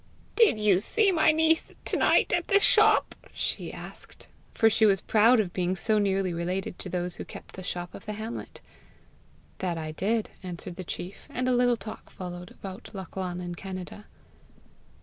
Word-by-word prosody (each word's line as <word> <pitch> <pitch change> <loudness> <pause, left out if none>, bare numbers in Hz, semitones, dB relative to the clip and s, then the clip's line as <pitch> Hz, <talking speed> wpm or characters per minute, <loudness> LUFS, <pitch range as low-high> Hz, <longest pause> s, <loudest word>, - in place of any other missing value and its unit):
"Did 445 - +5
you 205 -4 +4
see 405 - +2
my 315 -3 +4
niece 320 +1 +2
to - - -1
night - - +3
at 345 -1 0
the 400 - +5
shop?" - - +5 0.2
she - - -2
asked; - - -11 0.2
for 225 - +3
she 220 0 +4
was 195 -2 +3
proud 225 +5 +4
of 185 -5 -1
being 180 0 0
so 215 +3 +2
nearly 195 -2 +1
related 180 +2 -3
to 185 - -6
those 180 0 -2
who - - -5
kept - - -11
the 185 - -8
shop 175 -1 -4
of 195 - -11
the 210 - -3
hamlet. 220 +2 -7 1.0
"That 180 -3 -2
I 155 -1 -4
did," 210 +7 -1
answered 180 -1 -4
the 185 - -5
chief; 180 +2 -7
and 255 0 -2
a 255 - +3
little 245 -1 +3
talk 220 -1 -9
followed 180 -1 -8
about 195 -1 -9
Lachlan 185 -1 -5
in 175 -1 -5
Canada. 185 +3 -8
195 Hz, 180 wpm, -27 LUFS, 180-225 Hz, 1.0 s, Did